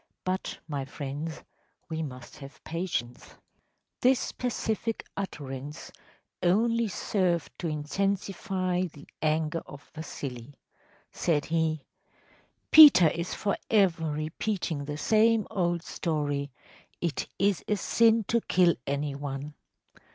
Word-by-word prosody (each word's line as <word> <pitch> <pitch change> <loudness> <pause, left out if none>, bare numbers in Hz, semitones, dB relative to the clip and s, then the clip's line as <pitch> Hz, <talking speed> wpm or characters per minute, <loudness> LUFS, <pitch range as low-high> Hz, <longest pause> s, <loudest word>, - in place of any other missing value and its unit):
But, 185 +1 -2
my 145 -3 -3
friends, 145 +3 -6 0.4
we 160 -1 -3
must 130 -5 -8
have 140 -1 -12
patience.‚ÄĚ 160 -8 -4 0.7
This 255 0 +3
pacific 225 -2 -2
utterance 145 -7 -6 0.5
only 230 +6 +3
served 180 -4 0
to 175 - -2
intensify 185 +3 -1
the 145 -1 -14
anger 155 +1 +1
of 140 0 -12
Vasili. 140 -4 -7 0.6
Said 150 -4 0
he: 160 -2 0 0.9
“Peter 290 - +10
is 170 +3 -3
forever 195 -5 +1
repeating 155 +1 -2
the 150 0 -4
same 220 +4 +3
old 175 -3 0
story, 145 -4 -2 0.5
‚ÄėIt 170 -4 -1
is 200 -3 +2
a 210 - +2
sin 225 +3 +3
to 230 +3 +1
kill 175 -4 +4
any 140 +1 -1
one. 140 +1 -5
165 Hz, 105 wpm, -28 LUFS, 145-195 Hz, 0.9 s, Peter